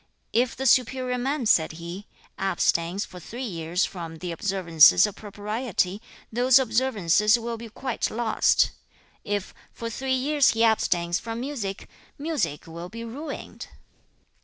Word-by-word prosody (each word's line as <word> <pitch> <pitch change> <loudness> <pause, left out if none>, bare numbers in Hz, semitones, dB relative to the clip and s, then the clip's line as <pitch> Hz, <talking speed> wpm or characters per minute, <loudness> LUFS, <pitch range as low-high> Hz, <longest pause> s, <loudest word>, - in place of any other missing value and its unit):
2. - - +4
'If 245 -1 0
the 265 - -4
superior 255 0 +2
man,' 270 +1 -1
said 160 -7 +3
he, 170 +5 -8 0.3
'abstains 180 0 0
for 180 - -11
three 235 +9 -7
years 170 -3 -1
from 165 -3 -7
the 175 +2 -5
observances 170 -3 +5
of 210 - -5
propriety, 210 -1 -2 0.3
those 250 +2 +5
observances 220 -4 +3
will 235 0 -4
be 230 0 -9
quite 255 +3 -3
lost. 225 -1 +2 0.5
If 205 -2 -3 0.2
for 230 0 -6
three 260 +2 -1
years 285 +2 +3
he 225 0 +1
abstains 175 -6 +2
from 230 0 -5
music, 240 -7 -4 0.3
music 290 - -2
will 170 +2 -8
be 230 +3 -7
ruined. 270 +7 -7
220 Hz, 140 wpm, -25 LUFS, 180-250 Hz, 0.5 s, observances